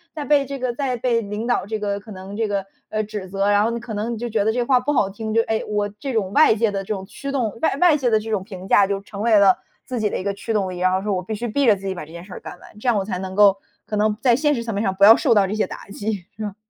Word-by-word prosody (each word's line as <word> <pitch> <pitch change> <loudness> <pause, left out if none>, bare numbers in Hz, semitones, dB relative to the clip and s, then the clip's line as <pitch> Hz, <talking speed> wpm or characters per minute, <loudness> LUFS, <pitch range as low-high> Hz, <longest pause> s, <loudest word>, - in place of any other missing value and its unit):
在 300 - -4
被 280 0 +3
这 275 0 -6
个 250 -1 -1
在 260 0 -2
被 235 -1 +1
领 210 +1 -5
导 245 -6 +1
这 215 +1 -3
个 200 -1 -2
可 215 +2 -13
能 190 +1 -8
这 225 - 0
个， 200 -2 -2 0.2
呃， 215 - -1
指 210 -2 -6
责。 195 +1 0
然 205 0 +4
后 225 - +1
你 235 - -3
可 235 -1 -8
能 215 +3 -2
你 - - -5
就 240 +2 -4
觉 220 -3 0
得 220 - +2
这 245 +2 -1
话 255 +1 +3
不 260 +4 -1
好 250 -8 +2
听， 220 +2 -5
就 230 - +5
哎， 220 -1 -1
我 210 -1 0
这 275 - -4
种 200 -4 -1
外 305 -3 +6
界 225 0 +2
的 195 -1 -3
这 205 - -3
种 190 -1 -7
驱 275 +7 -7
动， 240 -7 -1
外 320 - +2
外 350 -4 +5
界 265 -4 +1
的 220 -1 +3
这 220 +1 -7
种 200 -3 0
评 190 -2 -9
价 200 - +5
就 200 -1 -1
成 200 0 -8
为 225 -1 +4
了 195 -2 +6 0.3
自 255 - -4
己 215 -1 +1
的 - - -2
一 - - -5
个 200 0 -1
驱 200 +3 -6
动 200 -4 0
力， 180 - -7
然 185 0 +2
后 185 +1 0
说 210 -1 -1
我 185 - -1
必 220 - -5
须 235 +3 -4
逼 280 +5 +1
着 220 - +7
自 195 0 -11
己 190 - -1
把 175 - -6
这 155 - -16
件 170 +1 -9
事 190 - -11
儿 - - -7
干 180 - -9
完， - - -16
这 250 - -6
样 230 - +3
我 195 - -1
才 190 -3 -3
能 190 0 -5
够 200 -1 +6 0.3
可 215 - -4
能 210 +1 +2
在 245 -3 +4
现 295 +3 +2
实 235 - -3
层 230 -1 -4
面 200 +2 -1
上 190 -3 0
不 195 - +1
要 220 +2 +10
受 250 -2 +2
到 205 -2 +5
这 195 - -3
些 215 - +1
打 - - -9
击 200 -2 -4
是 220 - -10
吧？ 205 -2 -5
215 Hz, 375 characters per minute, -22 LUFS, 200-235 Hz, 0.3 s, 要